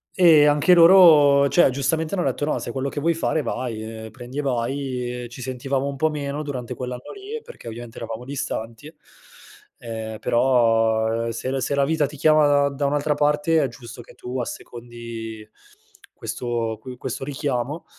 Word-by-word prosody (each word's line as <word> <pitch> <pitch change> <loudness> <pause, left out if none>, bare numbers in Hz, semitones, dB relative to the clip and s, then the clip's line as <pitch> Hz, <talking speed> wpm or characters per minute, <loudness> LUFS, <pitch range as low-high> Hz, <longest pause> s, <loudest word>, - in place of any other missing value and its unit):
Eh, 165 -5 +6
anche 150 +5 +4
loro, 165 -6 +7
cioè 140 +1 +5
giustamente 155 +6 -1
hanno 180 - 0
detto, 145 - -1
no: 150 - 0
"Se - - -6
è - - -3
quello 135 +1 -2
che 145 - -5
vuoi 165 +3 +2
fare, 160 -1 -1
vai! 120 -5 -4 0.2
Ehm, 110 - -10
prendi 130 +2 -8
e - - +1
vai!" 125 -1 -2
Ehm, - - -6
ci 120 +2 -10
sentivamo 130 +2 -2
un 140 - -4
po' 155 +3 +1
meno 145 -1 -4
durante 130 -5 -5
quell'anno 125 -1 -7
lì, 410 +3 -7
perché 485 +1 -13
ovviamente 115 0 -8
eravamo 115 +1 -6
distanti, 125 0 -5 0.9
ehm, 110 -2 -6
però, 115 -2 +2
ehm, - - -2
se 115 +3 -4
la 135 - -1
se 130 +2 -1
la 140 0 +2
vita 155 -1 +1
ti 150 +2 -11
chiama 155 0 +4
da 145 0 +3
da 140 0 -3
un'altra 145 +1 +1
parte, 150 +3 +2
è 140 - +1
giusto 120 0 -11
che - - -16
tu 125 +1 -5
assecondi 115 -2 -7 0.7
questo 115 -3 -3
que 125 +2 -9
questo 130 +1 -5
richiamo, 140 +1 -3
135 Hz, 185 wpm, -23 LUFS, 120-150 Hz, 0.9 s, loro